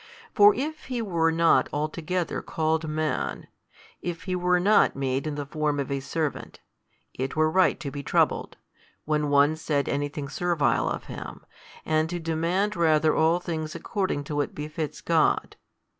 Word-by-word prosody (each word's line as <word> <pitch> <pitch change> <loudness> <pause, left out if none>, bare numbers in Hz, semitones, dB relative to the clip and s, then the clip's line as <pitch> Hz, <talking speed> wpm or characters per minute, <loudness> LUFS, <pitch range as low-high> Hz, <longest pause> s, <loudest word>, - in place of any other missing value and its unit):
For 410 0 +7
if 310 0 -4
He 250 -2 -3
were 170 -7 +1
not 165 0 +3
altogether 160 +4 -2
called 160 0 -1
Man, 155 0 -2 0.6
if 175 -1 -5
He 185 -2 -2
were 180 0 +2
not 205 +4 +4
made 135 +1 -1
in 150 - -3
the 145 -1 -4
form 150 0 -1
of 140 -1 -3
a 140 - 0
servant, 155 +2 -4 0.5
it 130 +1 -4
were 155 0 +2
right 185 +2 +3
to 145 -5 -5
be 145 - -5
troubled, - - 0 0.5
when 150 -1 0
one 145 +2 +4
said 150 -3 -1
anything 145 0 -2
servile 170 0 +1
of - - -4
Him, - - -9 0.4
and 155 0 +1
to 175 - -3
demand 170 +5 -1
rather 160 -2 +3
all 165 +2 +3
things 160 -3 -4
according 190 -8 -2
to 145 +1 -5
what 145 - -1
befits 150 +1 -5
|205 - - -36
God. 160 -2 +2
155 Hz, 165 wpm, -26 LUFS, 145-175 Hz, 0.6 s, For